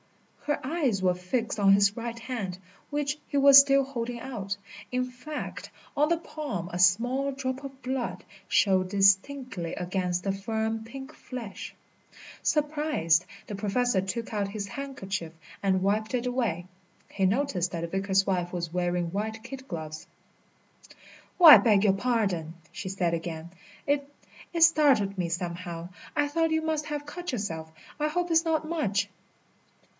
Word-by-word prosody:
Her 295 - 0
eyes 270 - 0
were 185 -1 +3
fixed 210 +6 -2
on 195 -1 +6
his 200 +1 +4
right 235 0 -5
hand, 225 -7 -4 0.3
which 295 0 -2
he 285 - -2
was 275 0 +10
still 275 0 +5
holding 240 -3 -4
out. 200 -6 -4 0.3
In 255 0 0
fact, 255 +5 -7 0.3
on 300 +2 +3
the 340 - +3
palm 285 - -5
a 175 - -3
small 245 +10 +3
drop 265 0 -4
of 270 -1 -9
blood 255 -1 -3 0.3
showed 185 -2 +3
distinctly 195 0 +2
against 180 -1 -2
the 195 - 0
firm, 220 +2 -2
pink 265 +5 -9
flesh. 235 -10 -8 0.7
Surprised, 295 - +1 0.2
the 205 - -6
Professor 210 +1 +1
took 210 +5 -4
out 200 -2 -1
his 200 0 -5
handkerchief 195 - -5 0.3
and 190 -2 +1
wiped 215 +4 0
it 245 0 -1
away. 235 -9 -1 0.5
He 195 -1 +2
noticed 200 -5 0
that 170 - -4
the 170 - -2
vicar's 195 +2 +1
wife 180 -2 -1
was 170 -2 -4
wearing 175 -1 0
white 220 +3 -3
kid 260 +1 -9
gloves. 155 -2 -6 1.3
"Oh, 355 - +6
I 310 - +13
beg 210 -4 +4
your 200 -3 +5
pardon!" 195 -8 -1 0.2
she 190 - -6
said 180 -3 0
again. 165 0 -4 0.3
"It 285 0 0 0.4
it 335 -2 +3
startled 280 - +4
me 175 -2 0
somehow. 170 -1 -4 0.3
I 290 0 +2
thought 325 +3 +1
you 320 0 +1
must 310 -1 -1
have 295 -1 -4
cut 350 +4 -5
yourself. 165 -9 -4 0.3
I 300 - +1
hope 350 +2 -1
it's 325 0 +5
not 315 -2 0
much?" 225 - 0
220 Hz, 155 wpm, -28 LUFS, 185-275 Hz, 1.3 s, I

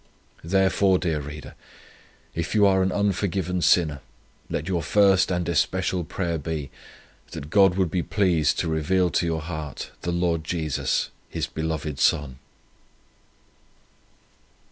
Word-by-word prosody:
Therefore, 95 +2 +3
dear 80 -4 -1
reader, 75 +1 -8 0.8
if 85 +5 -3
you 105 -1 +5
are 95 -1 +4
an 95 0 +1
unforgiven 95 -3 -1
sinner, 80 -5 +3 0.5
let 75 - -3
your 90 -3 0
first 95 0 +4
and 90 -2 -1
especial 90 +2 0
prayer 85 0 -3
be, 75 -2 -4 0.6
that 75 +3 -7
God 95 -3 +5
would 90 -4 +1
be 90 - 0
pleased 85 -7 +1
to - - -1
reveal 85 +3 +1
to 85 - +1
your 80 -1 -1
heart 75 -3 -6
the 85 - -2
Lord 85 -2 0
Jesus, 80 -3 -1 0.2
His - - -2
beloved 80 -3 -4
Son." 65 -1 +1
85 Hz, 130 wpm, -24 LUFS, 80-95 Hz, 0.8 s, you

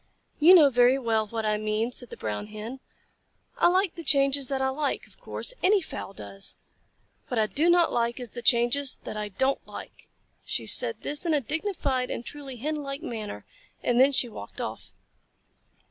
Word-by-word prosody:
"You 340 +5 +8
know 295 -6 +7
very 245 +1 +5
well 225 -4 0
what 225 +1 -3
I 210 0 +1
mean," 215 +2 -1
said 245 -1 -5
the - - -9
Brown 105 - -4
Hen. 215 +5 -7 0.8
"I - - +6
like 370 0 +2
the 335 - -8
changes 275 -2 +3
that 270 0 -1
I 265 0 +1
like, 285 +2 -2
of - - -21
course. - - -3
Any 400 +2 +4
fowl 315 - -7
does. 195 0 -4 0.7
What 250 - -3
I 220 - +3
do 305 +10 +1
not 345 -1 +4
like 235 +1 0
is 245 -3 -7
the 240 - -7
changes 240 +3 +2
that - - -6
I 210 -1 -3
don't 265 +8 0
like." - - -11 0.3
She - - -3
said - - +4
this 290 0 -2
in 330 -3 +2
a - - +3
dignified 280 - -2
and 235 - -4
truly 275 -2 -8
Hen 300 +6 -3
like 275 +2 -6
manner, 220 -7 -6 0.4
and 245 0 +2
then 270 +2 +6
she 260 -2 +2
walked 105 - -10
off. - - -6
265 Hz, 190 wpm, -27 LUFS, 230-295 Hz, 0.8 s, You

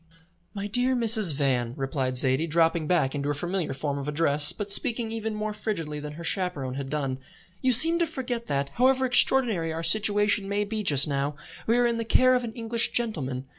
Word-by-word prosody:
"My 200 0 -5
dear 245 +5 0
Mrs. 220 - +4
Van," 125 -4 -1
replied 135 -1 -3
Zaidie, 130 +6 +1
dropping 165 0 +1
back 155 -7 +1
into 145 -1 -4
her 145 - -1
familiar 175 +4 -3
form 140 +1 -4
of 140 - -7
address, 150 -1 +2
but 205 -1 -5
speaking 225 +2 +1
even 220 -1 -4
more 215 0 -4
frigidly 165 -9 -5
than 150 0 -8
her 170 +3 -10
chaperon 165 -8 -2
had 135 0 -6
done, 135 -3 -3 0.4
"you 260 - +2
seem 325 +8 +5
to 340 - +1
forget 245 -4 -5
that, 140 0 -2
however 260 - +1
extraordinary 245 -9 +4
our 165 +1 -5
situation 205 0 +2
may 205 +1 -1
be 215 +1 -4
just 145 -9 +2
now, 140 0 -2 0.3
we 230 +2 +2
are 245 - +2
in 235 -1 -1
the - - -2
care 255 +3 +3
of 250 -1 0
an 230 -2 -6
English 230 0 +1
gentleman. 135 - -2
180 Hz, 205 wpm, -25 LUFS, 145-225 Hz, 0.4 s, seem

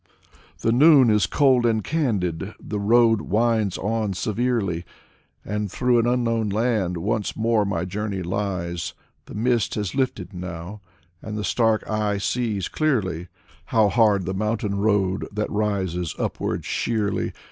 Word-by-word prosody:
The 115 - +2
noon 135 -1 +6
is 105 -5 +3
cold 130 +3 +3
and 110 -3 +1
candid, 105 - -1
the 105 - -4
road 115 +1 +4
winds 110 -2 +1
on 105 0 -1
severely, 110 -4 -1 0.6
And 105 -1 -3
through 125 +2 +2
an 115 - +1
unknown 115 -3 +1
land 105 -4 0
once 105 +4 -2
more 110 -1 +2
my 95 -3 -1
journey 100 0 -3
lies. 90 -2 -3 0.3
The - - -10
mist 115 0 +1
has 105 -4 -2
lifted 105 -8 -2
now, 90 +2 -7 0.4
and 105 -1 -6
the 105 - -3
stark 110 0 +1
eye 105 -1 0
sees 105 -2 -1
clearly 95 - -1 0.4
How 110 -2 +3
hard 105 -4 +3
the 95 - -2
mountain 105 0 -1
road 100 -2 +1
that 105 +1 -3
rises 95 -5 -1
upward - - -3
sheerly. 110 -3 -1
105 Hz, 140 wpm, -23 LUFS, 95-115 Hz, 0.6 s, noon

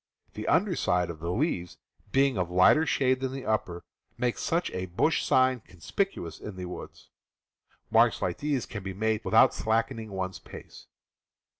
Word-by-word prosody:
The 105 - -6
under 180 +1 +2
side 90 - +1
of 80 - -11
the 85 +2 -4
leaves, 90 - -1 0.3
being 135 +1 +3
of 90 -3 -1
lighter 95 - +5
shade 130 -1 +2
than 130 -1 -2
the 135 -1 -6
upper, 90 -5 -1 0.3
makes 120 0 -1
such 170 +2 0
a 95 0 -4
bush 120 - +1
sign 130 -1 +3
conspicuous 90 - -4
in 105 - -8
the 90 0 -6
woods. 90 - -9 0.8
Marks - - +4
like 90 -1 -2
these 145 -4 -1
can 105 - -7
be 95 0 -6
made 110 +1 0
without - - +5
slacking 115 0 -1
one's 95 -1 -4
pace. - - -12
110 Hz, 165 wpm, -28 LUFS, 90-130 Hz, 0.8 s, lighter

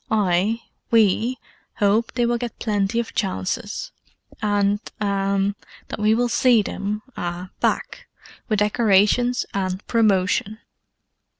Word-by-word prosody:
I—we—hope 215 +2 0
they 240 - +1
will 240 0 0
get 240 -1 -5
plenty 205 0 0
of 235 - -4
chances: 205 - -3 0.5
and—ah—that 200 -1 -1
we 215 +1 +3
will 245 +1 +1
see 240 -2 +4
them—ah—back, 200 -4 -3 0.4
with 215 - +2
decorations 210 +3 +3
and 190 0 -2
promotion. 210 -2 +1
210 Hz, 85 wpm, -22 LUFS, 195-230 Hz, 0.5 s, see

